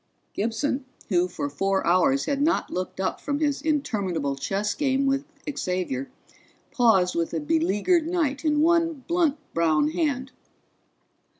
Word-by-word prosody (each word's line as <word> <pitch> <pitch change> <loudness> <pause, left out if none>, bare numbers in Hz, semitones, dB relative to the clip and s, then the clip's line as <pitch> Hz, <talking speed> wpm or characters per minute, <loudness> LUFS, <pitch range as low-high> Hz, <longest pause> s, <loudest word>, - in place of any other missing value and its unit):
Gibson, 245 +5 -1 0.2
who 180 -2 +2
for 160 - -4
four 195 +7 0
hours 185 +11 +3
had 280 -1 -1
not 315 +3 +1
looked 185 +1 -4
up 190 -1 -2
from 285 0 -1
his 290 -2 0
interminable 200 - -1
chess 200 +9 -1
game 275 -2 +1
with 275 +1 +1 0.3
Xavier, 180 -8 -2 0.6
paused 220 -8 +3
with 170 0 -1
a - - 0
beleaguered 195 - +1
knight 320 -5 -1
in 300 -1 +2
one 330 -3 +2
blunt 335 -4 +2 0.2
brown 155 -3 +2
hand. 265 - -1
240 Hz, 135 wpm, -25 LUFS, 180-290 Hz, 0.6 s, hours